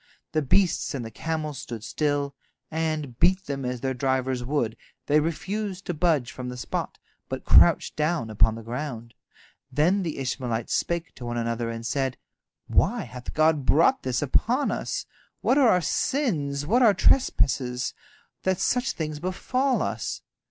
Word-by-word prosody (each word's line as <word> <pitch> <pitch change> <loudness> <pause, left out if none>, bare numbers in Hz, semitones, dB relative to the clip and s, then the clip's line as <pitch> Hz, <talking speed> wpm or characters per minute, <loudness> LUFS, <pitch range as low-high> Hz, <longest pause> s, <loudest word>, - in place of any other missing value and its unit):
The 155 - +1
beasts 165 +2 +2
and 125 -4 -4
the 115 - -7
camels 155 +1 -3
stood 120 -6 -7
still, 145 +5 -1 0.4
and, 155 -5 -2
beat 185 +1 +4
them 140 -1 -4
as 125 -1 -3
their 130 -1 -1
drivers 130 -1 0
would, 120 -4 -1 0.3
they 150 +1 +4
refused 190 +5 -3
to 175 - -2
budge 150 -6 +1
from 125 -1 -6
the 125 - -6
spot, 125 - -4 0.3
but - - -5
crouched - - +5
down 150 -7 0
upon 110 +1 +3
the 115 - -8
ground. 120 -1 -5 0.6
Then 165 +9 +3
the 165 -4 -3
Ishmaelites 125 -3 -2
spake 170 0 -1
to 125 - -9
one 120 0 -3
another, 115 0 -1
and 115 0 -5
said: 130 +1 -1 0.5
"Why - - +2
hath 125 -1 -9
God 155 -2 +3
brought 165 - +4
this 130 +1 -1
upon 240 - +2
us? - - -3 0.4
What 270 - +3
are 260 -5 +6
our 180 - +4
sins, 150 - 0
what 235 +10 +3
our 220 -5 +6
trespasses, 130 - +2 0.5
that 190 -1 0
such 250 +5 +1
things 155 -2 -4
befall 250 - 0
us?" 110 0 -3
145 Hz, 160 wpm, -26 LUFS, 125-175 Hz, 0.6 s, are